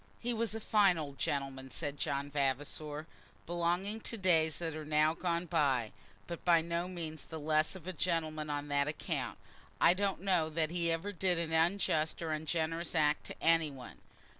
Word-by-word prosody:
"He 240 0 -1
was 225 -1 -1
a - - -2
fine 205 -5 +4
old 145 -3 -6
gentleman," 135 -2 -2
said 145 +1 -3
John 140 +1 -2
Vavasor; 145 +2 -1 0.4
"belonging 175 +5 0
to 230 - -4
days 165 -5 +3
that 165 -2 -3
are 155 - -5
now 155 +1 +3
gone 170 0 -1
by, 135 -8 +1 0.3
but 170 -1 -6
by 170 -2 +6
no 170 +2 -2
means 165 -4 -6
the 160 - -6
less 155 +3 +2
of 180 -3 -10
a 185 - -4
gentleman 155 -3 -1
on 145 0 -2
that 140 0 +2
account. 150 - -3 0.4
I - - +6
don't 195 -1 -1
know 180 -5 +2
that 160 0 0
he 170 -1 +1
ever 165 +5 -2
did 185 -2 +1
an 165 -1 -2
unjust 160 -2 +2
or 160 - -2
ungenerous 160 +2 -1
act 150 -1 +2
to - - -7
any 165 -1 +4
one. 135 -3 -10
160 Hz, 185 wpm, -33 LUFS, 150-175 Hz, 0.4 s, by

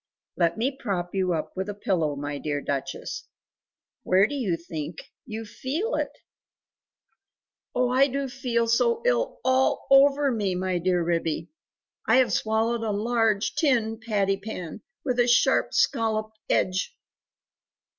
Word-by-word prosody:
"Let 170 -1 +1
me 245 +5 +1
prop 190 -9 -3
you 185 -2 +1
up 155 -1 -4
with 190 +2 -3
a 205 - -4
pillow, 165 -7 0
my 145 0 -4
dear 145 -1 -2
Duchess; 140 -1 -4 0.8
where 190 +2 +4
do 255 - -4
you 215 -12 -1
think 160 -1 -7 0.2
you 220 -1 -5
feel 305 - -3
it?" - - 0 1.7
"Oh 250 0 +2
I 265 +2 +5
do 275 0 -2
feel 245 -3 -1
so 465 - +2
ill - - +1
ALL 260 0 +2
OVER 275 +1 +6
me, 205 -6 -1
my 185 0 -1
dear 175 0 +1
Ribby; 165 - -1 0.6
I - - +5
have 260 -1 +4
swallowed 225 +2 +1
a 225 - -2
large 220 0 +1
tin 230 -8 +1
patty 200 -4 0
pan 195 -5 -7 0.2
with 250 -3 0
a 240 - +4
sharp 240 - +3
scalloped 220 -3 0
edge!" 190 - 0
220 Hz, 145 wpm, -26 LUFS, 180-255 Hz, 1.7 s, OVER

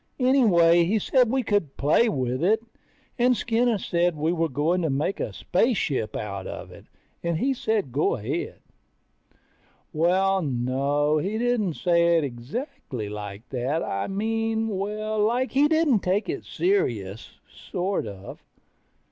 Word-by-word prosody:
Anyway 185 -11 +5
he 195 +6 +1
said 250 +3 +2
we 260 +1 +1
could 205 - -1
play 155 +11 +3
with 130 - -2
it, 220 +5 +2 0.6
and 245 0 +4
Skinny 235 0 +1
said 175 -2 0
we 155 +3 0
were 165 -1 0
going 155 +7 0
to 160 - 0
make 145 +8 -1
a - - -2
spaceship 155 - 0
out 100 -3 -5
of - - -8
it, - - -14 0.4
and 170 -1 -1
he 270 +9 +1
said 220 - -1
go 140 +5 +1
ahead. 105 -3 -4 1.3
Well, 190 +4 +2
no, 140 +2 0
he 200 +7 -2
didn't 230 -8 0
say 170 -1 +3
it 160 - +1
exactly 125 - -5
like 105 +1 -7
that. 135 +5 -1
I 100 0 -2
mean, 225 +2 -1
well, 210 +2 -3
like 240 +5 +1
he 280 +2 +4
didn't 315 -7 +3
take 190 +3 0
it - - -4
serious, 115 - -1
sort 185 - -3
of. 100 -1 -9
175 Hz, 145 wpm, -25 LUFS, 140-225 Hz, 1.3 s, Anyway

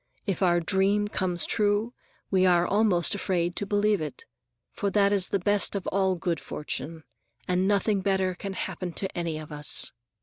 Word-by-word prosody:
If 195 -3 -2
our 175 -2 +4
dream 195 +4 +2
comes 180 -4 0
true, 210 +2 0 0.4
we 190 -1 +3
are 175 -1 +4
almost 200 -5 +2
afraid 175 -3 -1
to 205 - -2
believe 205 -2 +2
it; 150 -3 -6 0.5
for 200 - -2
that 200 0 +3
is 195 -2 +2
the - - +1
best 205 +2 +2
of 195 - -3
all 190 -1 +1
good 170 -2 -2
fortune, 160 +1 -5 0.4
and 180 +1 +1
nothing 205 0 +2
better 190 -1 +1
can 195 +2 -6
happen 185 -2 -4
to 190 +3 -3
any 170 -2 -2
of 155 -1 -9
us. 150 0 -1
190 Hz, 175 wpm, -27 LUFS, 175-205 Hz, 0.5 s, our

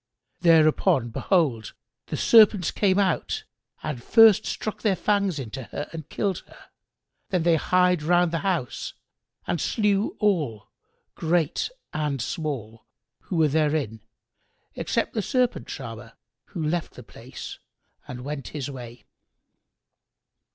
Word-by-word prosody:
Thereupon 155 -7 +4
behold, 125 - 0 0.3
the - - -3
serpents 210 -6 +5
came 195 -2 +2
out 195 -2 0 0.4
and 150 -6 -4
first 220 - +6
struck 215 - -4
their 205 -4 +2
fangs 200 -1 +1
into 130 0 -6
her 145 - -6
and 160 -2 -8
killed 195 -4 -1
her; - - -18 0.6
then 180 -3 0
they 170 0 +4
hied 180 +1 +2
round 175 +2 +3
about - - -10
the 165 - 0
house 175 -10 -2 0.5
and 170 - -1
slew 210 -2 +1
all, 150 - 0 0.4
great 165 -2 0 0.2
and 150 -3 -1
small, 120 -5 -4 0.4
who 185 - -4
were 160 -2 +4
therein; 150 -6 0 0.7
except - - -1
the 220 - 0
Serpent 250 +3 0
charmer, 115 -2 -8 0.3
who 170 - -5
left 170 +1 -2
the - - -10
place - - -10 0.5
and 125 0 -7
went 145 0 -5
his 140 0 -4
way. 120 -3 -10
160 Hz, 130 wpm, -25 LUFS, 135-190 Hz, 0.7 s, first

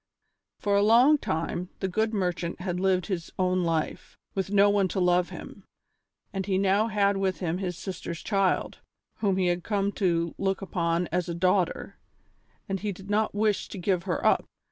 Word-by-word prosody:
For 205 -1 0
a 200 - +4
long 245 +8 +6
time 170 0 -2
the 190 - -1
good 220 +4 0
merchant 180 -5 -2
had 180 -1 -3
lived 185 -1 +2
his 180 -5 -4
own 185 -1 +1
life, 165 -2 -2 0.2
with 190 -1 -2
no 200 0 +5
one 200 -1 +3
to 190 - -3
love 180 0 +3
him, - - -10 0.7
and 195 -1 -2
he 190 -2 +1
now 200 +3 +3
had 200 -2 +2
with 190 -1 -1
him 175 -1 -2
his 180 -3 -3
sister's 175 -3 -6
child, 195 -3 0 0.4
whom 195 -3 +1
he 185 - +2
had 175 0 0
come 200 -2 0
to 170 -3 +1
look 195 0 0
upon 170 -2 -1
as 175 +1 -1
a 170 - -2
daughter, 180 +1 0 0.7
and 195 0 -2
he 210 +1 -2
did 195 +2 -9
not 215 0 +1
wish 210 -1 +1
to - - -8
give 180 0 0
her 180 - -2
up. - - +4
190 Hz, 190 wpm, -27 LUFS, 180-200 Hz, 0.7 s, long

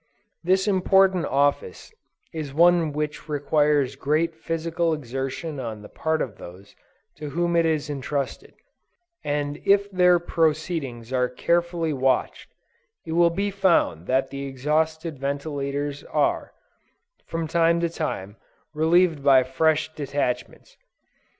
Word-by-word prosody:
This 190 +3 +2
important 190 -2 +3
office 145 - -1 0.4
is 150 -4 -6
one 170 -1 +4
which 150 +1 -4
requires 145 -1 +1
great 155 +4 0
physical 165 +1 -1
exertion 135 +3 -5
on 110 -4 -6
the - - -11
part 160 0 -1
of 110 -6 -8
those 95 +3 -12 0.4
to 150 - -6
whom 170 +3 0
it 165 -1 +3
is 155 -2 0
entrusted; 140 -1 -4 0.7
and 145 0 -2
if 200 0 +3
their 180 -1 +5
proceedings 155 -7 -1
are 125 -1 +1
carefully 170 +4 0
watched, 130 -1 0 0.6
it 160 - -6
will 170 +1 +4
be 200 +4 -2
found 180 - +1
that 130 +1 +1
the 140 0 -5
exhausted 155 +3 -1
ventilators, 140 0 -3
are, - - 0 0.8
from 165 -1 -3
time 170 +1 +2
to 170 - +2
time, 100 - -5 0.4
relieved 160 -1 +2
by 135 -2 +6
fresh 155 +4 +1
detachments. 135 -4 -4
155 Hz, 125 wpm, -24 LUFS, 140-170 Hz, 0.8 s, by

